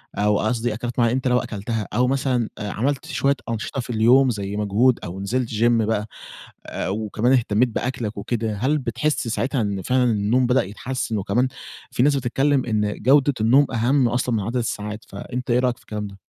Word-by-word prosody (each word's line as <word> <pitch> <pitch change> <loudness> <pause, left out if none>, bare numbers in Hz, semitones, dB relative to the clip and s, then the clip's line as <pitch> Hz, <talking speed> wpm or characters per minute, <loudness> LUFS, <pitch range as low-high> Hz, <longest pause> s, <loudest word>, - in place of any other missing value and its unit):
أو 105 0 +2
قصدي 115 +1 0
أكلات 120 +2 -4
معينة 115 0 +3
أنت 130 0 -1
لو 125 0 +3
أكلتها 110 0 -4
أو 125 +1 +2
مثلًا، 130 -3 0
آآ 105 - -4
عملت 135 +4 -1
شوية 140 +1 +1
أنشطة 115 +4 -3
في - - -11
اليوم 120 +4 +4
زي 100 -3 -3
مجهود 105 +5 +2
أو 90 +2 -6
نزلت 120 +4 -1
gym 115 +2 +2 0.2
بقى، 105 -1 -1 0.6
آآ - - -4
وكمان 110 +4 0
اهتميت 120 -1 +2
بأكلك 120 -2 -3
وكده، 110 +1 -2
هل 135 +8 +1
بتحس 135 +1 -1
ساعتها 130 +3 -1
إن 100 -2 -2
فعلًا 125 +5 +1
النوم 120 +2 +2
بدأ 125 +2 +3
يتحسن؟ 110 +3 -4
وكمان 105 +6 +1 0.4
في 120 - +1
ناس 145 +1 +4
بتتكلم 135 +1 +1
إن 105 -2 0
جودة 140 +3 +4
النوم 130 +6 +5
أهم 120 +3 +2
أصلًا 125 0 0
من 110 - 0
عدد 115 +5 -4
الساعات، 105 -2 -4
فأنت 125 +5 -5
إيه 120 - +4
رأيك 125 -1 0
في - - -22
الكلام 105 -1 -5
ده؟ 100 -1 -12
120 Hz, 190 wpm, -22 LUFS, 105-130 Hz, 0.6 s, النوم